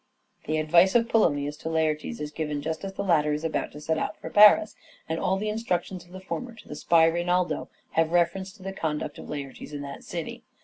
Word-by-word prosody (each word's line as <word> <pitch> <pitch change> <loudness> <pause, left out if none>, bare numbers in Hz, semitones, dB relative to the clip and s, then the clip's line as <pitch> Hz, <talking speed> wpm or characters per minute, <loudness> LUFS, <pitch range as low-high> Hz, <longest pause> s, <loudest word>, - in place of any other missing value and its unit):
The 155 +1 0
advice 170 +6 +4
of 230 -1 +4
Polonius 145 -11 +2
to 160 - -5
Laertes 160 +6 -1
is 150 0 -5
given 150 -2 -3
just 160 +1 -3
Laertes - - -6
and 195 - -4
as - - -24
the 200 - -1
latter 155 -5 +3
is 150 +2 -3
about 165 -1 -2
to 150 - -9
set 160 +1 -1
out 210 - -3
for - - -8
Paris, 210 +1 +7 0.3
and 160 +1 -2
all 190 0 +1
the 210 +2 -3
instructions 195 -4 -2
of 175 - -21
the 185 - -8
former 230 +5 -5
to - - -15
the - - -7
spy 165 +1 +4
Reynaldo 175 +2 0 0.2
have 165 0 +1
reference 175 +2 +1
to 205 -4 -16
the 195 0 -5
conduct 155 -5 -3
of - - -10
Laertes 145 0 -7
in 145 -1 -5
that 140 0 -8
city. - - -6
170 Hz, 235 wpm, -26 LUFS, 155-195 Hz, 0.3 s, Paris